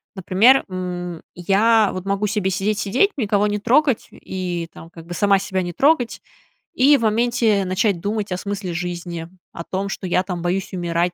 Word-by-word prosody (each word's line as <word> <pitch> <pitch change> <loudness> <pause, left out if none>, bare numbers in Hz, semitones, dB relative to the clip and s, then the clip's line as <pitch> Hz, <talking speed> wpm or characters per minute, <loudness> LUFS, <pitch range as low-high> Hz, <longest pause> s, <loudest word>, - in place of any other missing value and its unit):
Например, 200 +8 +4
м, 180 -2 -5
я 205 +4 +3
вот 185 0 -6
могу 200 +1 0
себе 200 -2 -1
сидеть-сидеть, 205 - +1
никого 210 -4 +1
не 210 - -1
трогать, 260 +3 +2
и 180 -3 -5
там 165 - -12
как 165 -1 -13
бы 175 - -6
сама 200 +1 +3
себя 190 -1 -2
не 175 - -5
трогать, 270 - +2 0.5
и 275 +3 +6
в - - -6
моменте 225 -2 +2
начать 185 0 0
думать 205 +1 -3
о 180 - -1
смысле 200 -2 -4
жизни, 175 -1 -5 0.2
о 170 - -7
том, 195 +3 -3
что 195 - -5
я, 180 0 +2
там, 180 -2 -5
боюсь 185 +2 -1
умирать, 175 -1 -1
195 Hz, 180 wpm, -21 LUFS, 180-215 Hz, 0.5 s, и